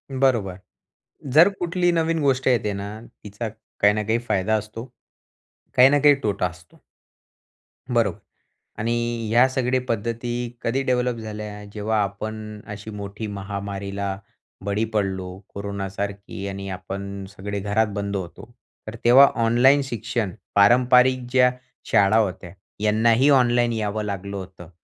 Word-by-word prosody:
बरोबर. 115 -9 +1 0.8
जर 165 +6 +8
कुठलीही 175 0 +1
नवीन 165 0 +1
गोष्ट 135 -2 +1
येते 110 -4 +2
ना, 100 0 -5 0.4
तिचा 105 +3 -5
काही 105 -1 0
ना 105 - -1
काही 110 +3 0
फायदा 100 +3 +1
असतो. 110 +2 -6 0.9
काही 125 +1 +8
ना 145 - +4
काही 145 0 +7
तोटा 100 -3 0
असतो. 90 -1 -12 1.1
बरोबर - - +2 0.6
आणि 115 +2 0 0.4
ह्या 120 +3 +5
सगळ्या 130 0 0
पद्धती 115 +2 -2 0.3
कधी 130 +4 0
डेव्हलप 125 -2 0
झाल्या, 105 -1 -7
जेव्हा 105 0 0
आपण 105 +1 -6
अशी 105 +1 -8
मोठी 105 +1 -6
महामारीला 100 -1 -4 0.5
बळी 100 +2 0
पडलो 95 -3 -2 0.2
कोरोनासारखी 100 0 -5
आणि 100 0 -6
आपण 100 +1 -6
सगळे 100 0 -5
घरात 105 +2 +1
बंद 100 0 -3
होतो. 95 +5 -7 0.4
तर 110 - -6
तेव्हा 130 +4 +9 0.2
ऑनलाईन 130 +5 +5
शिक्षण 115 -5 -3 0.2
पारंपरिक 125 +4 +5
ज्या 125 -1 +5 0.4
शाळा 100 +2 +4
होत्या 95 -4 -1 0.3
यांनाही 115 +5 +4
ऑनलाईन 120 -3 +4
यावं 110 -1 -2
लागलं 100 -1 -4
होतं 95 -3 -10
105 Hz, 130 wpm, -23 LUFS, 100-120 Hz, 1.1 s, तेव्हा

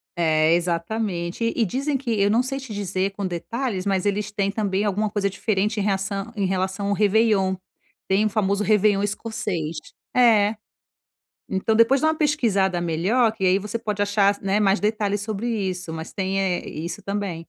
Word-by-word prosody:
É, 160 -1 +3
exatamente. 175 +4 -1
E 230 - +2
dizem 275 +8 -1
que 255 -3 -4
eu 200 - +4
não 230 +4 +3
sei 270 +1 -3
te 260 -4 -9
dizer 195 -1 -1
com 195 0 -5
detalhes, 190 +4 -3
mas 195 -1 0
eles 205 +1 -1
têm 200 -1 0
também 205 -1 -1
alguma 210 +1 0
coisa 200 -1 0
diferente 210 +1 -1
em - - 0
reação 195 +1 -2
em 200 -2 0
relação 190 +2 -1
ao - - +2
réveillon. 205 -2 +2 0.5
Tem 195 +3 +2
o - - +2
famoso 200 -1 0
réveillon 210 -1 +3
escocês. 205 -6 -3 0.4
É. 225 -4 +5 0.9
Então 190 +4 0
depois 230 +4 +4
dá 315 - +3
uma 315 - +2
pesquisada 200 - +1
melhor, 195 +9 +2
que 195 -4 -3
aí 185 +1 +4
você 210 +3 -4
pode 210 -3 -3
achar, 205 0 +2
né, 195 +1 +1
mais 200 0 +2
detalhes 210 -1 0
sobre 215 +2 -3
isso, 185 -7 -3
mas 160 +1 -6
tem, 195 0 -2
eh, 190 -2 -1
isso 165 +3 -6
também. 200 -3 -3
200 Hz, 180 wpm, -23 LUFS, 190-220 Hz, 0.9 s, É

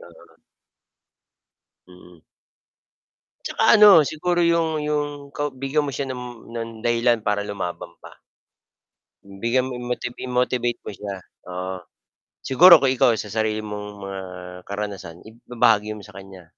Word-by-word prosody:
Oo. 85 -1 -17 1.5
Mm. 90 -1 -17 1.3
Tsaka - - -2
ano, 205 -5 +9
siguro 175 +4 -1
'yong 165 -2 +2
'yong 150 -1 -1 0.3
ka 145 -1 -2
bigyan 135 +3 -1
mo 145 - -3
siya 135 +3 -3
ng 125 -2 -8
ng 115 -1 -4 0.2
dahilan 120 0 +2
para 105 -1 -1
lumaban 90 -4 -5
pa. - - -14 1.1
Bigyan 115 +6 -1
mo 130 - -6
i-motiv 125 0 -4
i-motivate 125 -1 -1
mo - - -5
siya, 100 -1 -6 0.3
oo. 90 +1 -5 0.6
Siguro 170 +5 +7
kung 135 -1 +2
ikaw, 130 -1 +4
sa - - -5
sarili 110 +1 -1
mong 105 -1 -6
mga 100 -1 -6 0.4
karanasan 100 -4 -6
ib 115 +2 -16
ibabahagi 110 -3 +2
mo - - -11
sa 105 - -16
kanya. 95 -2 -12
115 Hz, 135 wpm, -22 LUFS, 100-135 Hz, 1.5 s, ano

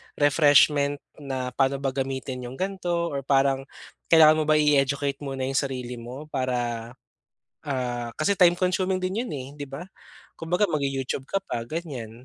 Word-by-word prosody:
refreshment 145 0 +4 0.2
na 130 -3 -4
paano 135 +1 +1
ba 135 - +1
gamitin 130 -1 -3
yung 125 - -8
ganto, 175 -2 -2
or 140 - -2
parang 135 0 +1 0.4
kailangan 155 -1 +7
mo 155 - 0
ba 155 - +4
i-educate 140 -1 +2
muna 135 -2 -4
yung 135 +1 +1
sarili 125 -3 -4
mo, 125 +5 -8
para, 120 -3 -2 0.7
ah, 125 -3 -3
kasi 155 +6 +2
time 175 -2 +5
consuming 185 +1 +1
din 185 +4 -1
iyan 245 - -4
eh, 130 0 -6
di 145 - -4
ba? 135 +5 -7 0.6
Kumbaga 175 +5 +1
mag-YouTube 135 -2 -2
ka - - -2
pa 115 - -4
ganyan. 125 -8 -6
140 Hz, 155 wpm, -25 LUFS, 130-155 Hz, 0.7 s, kailangan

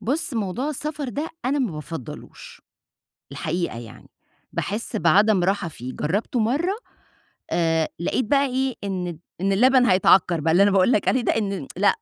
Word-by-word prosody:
بُص 280 +2 -1
موضوع 225 +5 -2
السفر 300 -1 -4
ده 290 +6 -3 0.2
أنا 275 +3 +1
ما 250 -6 0
بافضلوش، 150 -3 -9 0.7
الحقيقة 155 -2 -3
يعني، 115 -2 -12 0.4
باحس 210 +3 -3
بعدم 195 +2 +4
راحة 195 -1 0
فيه، 130 -4 -8
جربته 205 +9 -1
مرّة، 290 - +1 0.8
آآ 165 -2 +1
لاقيت 175 +9 -1
بقى 280 +5 +2
إيه 265 0 -1
إن 190 -2 -2
الد 170 -3 -7 0.2
إن 195 +1 +1
اللبن 250 +5 +5
هيتعكر 185 -5 +4
بقى، 160 +2 +1
اللي 180 +4 +5
أنا 205 - +5
باقول 195 +4 +4
لك 210 - +1
عليه 260 - +3
ده، 235 - +1
إن 195 -9 -2
لأ 200 +2 +3
200 Hz, 165 wpm, -23 LUFS, 170-255 Hz, 0.8 s, اللبن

